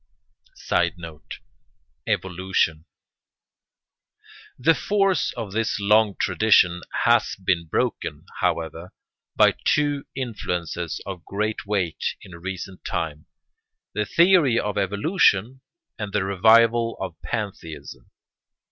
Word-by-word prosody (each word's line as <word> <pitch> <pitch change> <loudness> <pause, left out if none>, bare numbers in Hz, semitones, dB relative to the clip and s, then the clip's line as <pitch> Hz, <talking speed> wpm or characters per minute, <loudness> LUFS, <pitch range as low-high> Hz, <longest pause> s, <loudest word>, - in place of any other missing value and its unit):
] - - -52
[Sidenote: 85 -3 -3 0.7
Evolution] 90 -3 0 1.7
The 160 +6 +4
force 195 0 +1
of 115 -5 -6
this 110 0 -1
long 105 0 +3
tradition 90 -2 +3 0.2
has - - +3
been 90 -3 -1
broken, - - -2
however, 80 +2 -2 0.4
by - - +5
two 145 -1 +1
influences 90 - -4
of 95 -3 -7
great 105 +3 -3
weight 95 -6 -1
in 90 - -11
recent 95 +1 -7
times, 75 -2 -4 0.7
the 105 0 -1
theory 170 -9 +4
of 105 -1 -2
evolution 110 - +1 0.4
and 105 -2 -5
the 105 - +1
revival 115 +4 +4
of 95 -3 -5
pantheism. 100 -8 -6
100 Hz, 100 wpm, -23 LUFS, 90-115 Hz, 1.7 s, by